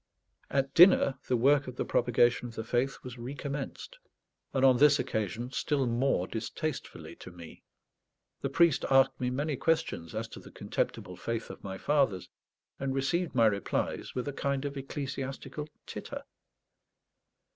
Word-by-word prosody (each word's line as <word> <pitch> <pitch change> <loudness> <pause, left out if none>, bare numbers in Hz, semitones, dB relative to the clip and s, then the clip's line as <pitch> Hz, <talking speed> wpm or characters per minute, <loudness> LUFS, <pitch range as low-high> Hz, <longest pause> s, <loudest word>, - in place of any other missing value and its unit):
At 135 0 0
dinner 165 -7 +6
the 125 - +2
Work 140 +3 +4
of 125 - -6
the - - -2
Propagation 120 0 +2
of 115 - -11
the 110 - -3
Faith 125 +4 0
was 125 -1 -8
recommenced, 140 - -6 0.5
and 135 0 +2
on 130 -2 +6
this 145 +1 +6
occasion 110 +4 -2
still 140 -1 0
more 120 -5 +1
distastefully 130 - -5
to - - -10
me. 85 -2 -12 0.8
The - - -1
priest 170 -4 +3
asked 135 0 +4
me 125 - +1
many 145 +4 -1
questions 115 - -1
as 115 +1 -2
to - - -9
the - - -13
contemptible 90 -1 -3
faith 115 -1 -4
of - - -12
my 95 -1 -5
fathers, 135 -8 +1 0.5
and 135 0 -2
received 155 +4 0
my 115 -2 +5
replies 100 -2 -1
with 125 +2 -2
a 145 - -3
kind 140 0 -1
of 140 0 -3
ecclesiastical 135 +2 -5 0.2
titter. - - -7
130 Hz, 155 wpm, -30 LUFS, 115-140 Hz, 0.8 s, dinner